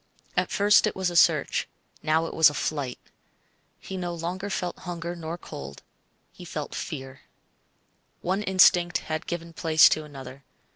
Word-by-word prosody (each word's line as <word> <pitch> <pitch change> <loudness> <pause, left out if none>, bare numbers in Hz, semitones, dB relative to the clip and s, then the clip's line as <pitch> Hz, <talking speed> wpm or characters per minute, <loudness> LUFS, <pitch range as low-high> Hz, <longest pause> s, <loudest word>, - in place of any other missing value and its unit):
At - - +1
first 205 0 +4
it - - -3
was 185 -2 -1
a - - -7
search; - - +3 0.3
now 160 +1 +1
it - - -6
was 160 -2 +6
a 145 - -8
flight. 140 -5 -2 0.8
He 190 - -7
no 175 -1 -3
longer 180 +4 -4
felt 180 -2 -3
hunger 175 -1 -5
nor 165 0 -5
cold 70 - -9 0.5
he - - -12
felt - - -6
fear. 130 0 -6 1.0
One 190 +3 -1
instinct 180 -3 +4
had 155 +1 -5
given 170 -1 -5
place 160 -1 +6
to 155 - 0
another. 135 -2 -10
170 Hz, 155 wpm, -26 LUFS, 155-180 Hz, 1.0 s, was